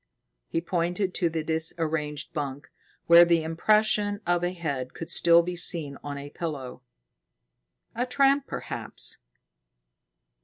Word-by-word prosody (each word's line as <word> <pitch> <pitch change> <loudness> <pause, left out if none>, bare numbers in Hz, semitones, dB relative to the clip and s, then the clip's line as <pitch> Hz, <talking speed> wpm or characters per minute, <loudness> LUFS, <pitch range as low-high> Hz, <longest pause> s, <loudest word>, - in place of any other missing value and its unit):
He 165 - -2
pointed 175 +2 -1
to 170 - 0
the 160 -1 -3
disarranged 160 -1 -2
bunk, 140 -3 -5 0.3
where 170 +1 +9
the 170 -2 +2
impression 205 +5 +2
of 175 0 +1
a 175 - 0
head 145 -8 -4
could 165 - -7
still 170 0 +5
be 180 +1 -4
seen 160 -5 0
on 145 -1 -5
a 140 +1 -8
pillow. 145 -8 -6 1.1
"A 245 +2 -2
tramp, 275 +2 +3
perhaps." - - -5
170 Hz, 125 wpm, -26 LUFS, 150-180 Hz, 1.1 s, where